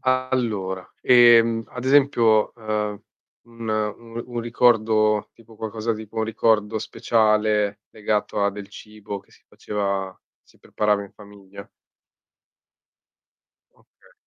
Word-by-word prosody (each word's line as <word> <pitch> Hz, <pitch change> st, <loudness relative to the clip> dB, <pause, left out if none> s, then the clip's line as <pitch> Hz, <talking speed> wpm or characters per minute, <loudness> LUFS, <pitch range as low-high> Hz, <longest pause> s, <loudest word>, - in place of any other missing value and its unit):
Allora, 120 Hz, -8 st, -1 dB
ehm, 115 Hz, -2 st, +5 dB
ad 125 Hz, 0 st, -8 dB
esempio 130 Hz, -6 st, +3 dB
,ehm, 105 Hz, -2 st, -3 dB, 0.4 s
un 115 Hz, -1 st, -9 dB
u 110 Hz, +2 st, -3 dB
un 120 Hz, -1 st, -4 dB
ricordo, 110 Hz, -3 st, +2 dB
tipo 115 Hz, -1 st, -18 dB
qualcosa 110 Hz, +1 st, -3 dB
tipo 110 Hz, 0 st, -9 dB
un 110 Hz, -, 0 dB
ricordo 110 Hz, -1 st, +1 dB
speciale, 105 Hz, -2 st, +1 dB
legato 105 Hz, -1 st, -2 dB
a 100 Hz, -, +2 dB
del 100 Hz, 0 st, -9 dB
cibo 105 Hz, -2 st, -9 dB
che -, -, -30 dB
si -, -, -24 dB
faceva 100 Hz, -2 st, -4 dB, 0.2 s
si -, -, -27 dB
preparava 105 Hz, -1 st, -1 dB
in 100 Hz, -, -12 dB
famiglia. 100 Hz, -1 st, -14 dB, 2.1 s
Okay. -, -, -27 dB
110 Hz, 115 wpm, -23 LUFS, 105-115 Hz, 2.1 s, ehm